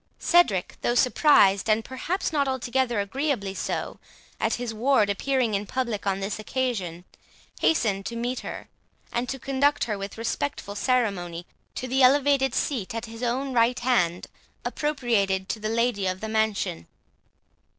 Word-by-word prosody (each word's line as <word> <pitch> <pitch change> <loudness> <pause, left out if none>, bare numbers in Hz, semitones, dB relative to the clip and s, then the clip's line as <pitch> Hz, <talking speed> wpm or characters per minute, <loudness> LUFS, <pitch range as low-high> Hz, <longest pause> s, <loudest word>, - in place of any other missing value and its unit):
Cedric, 255 - +2
though 240 - +1
surprised, 240 -7 +4
and 215 +1 +2
perhaps 320 +7 -3
not 285 -2 +2
altogether 255 -2 0
agreeably 205 -1 -1
so, - - -4 0.4
at - - +1
his 240 -2 -4
ward 220 -2 +3
appearing 250 +1 0
in 200 0 -1
public 235 -5 -2
on 195 0 +1
this 200 +2 -3
occasion, 210 -8 -3 0.5
hastened 210 -11 +2
to 235 - -5
meet 245 +2 -2
her, - - -7 0.5
and 240 +1 -1
to 270 - -3
conduct 275 +2 +1
her, 210 -3 -2
with 200 +2 -6
respectful 230 -1 -3
ceremony, 200 -8 -1 0.3
to 255 - -4
the 265 +2 +1
elevated 270 0 +4
seat 230 -7 -1
at 230 +1 -3
his 225 0 -10
own 255 +2 -1
right 240 +1 +2
hand, 180 -9 +1 0.4
appropriated 225 -10 0
to 220 - -2
the 215 0 -3
lady 225 -3 +1
of 185 0 -2
the 220 - -5
mansion. 220 - -1
235 Hz, 150 wpm, -26 LUFS, 200-260 Hz, 0.5 s, surprised